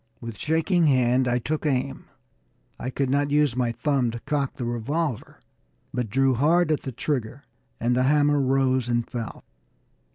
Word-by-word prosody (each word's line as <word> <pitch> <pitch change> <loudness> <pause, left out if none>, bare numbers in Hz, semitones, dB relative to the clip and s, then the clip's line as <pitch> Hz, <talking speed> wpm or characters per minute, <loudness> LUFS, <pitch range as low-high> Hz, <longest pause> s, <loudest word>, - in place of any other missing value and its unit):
With 115 -2 -7
shaking 165 +2 +2
hand 130 -1 +3
I 120 0 +2
took 150 +5 -3
aim; 135 -2 -1 0.7
I 125 - -3
could 135 +1 -1
not 145 +1 +1
use 145 -4 +2
my 125 -2 0
thumb 135 0 0
to 120 +1 -5
cock 140 -2 -2
the 125 - -4
revolver, 125 +3 -3 0.5
but 125 -3 -2
drew 135 +4 +2
hard 155 +6 +3
at 155 - +1
the 135 - -5
trigger, 130 0 -3 0.4
and 120 +1 +1
the 130 +1 +2
hammer 145 -1 +3
rose 130 -2 +1
and 120 -1 0
fell. 115 -3 -6
130 Hz, 165 wpm, -25 LUFS, 120-145 Hz, 0.7 s, hand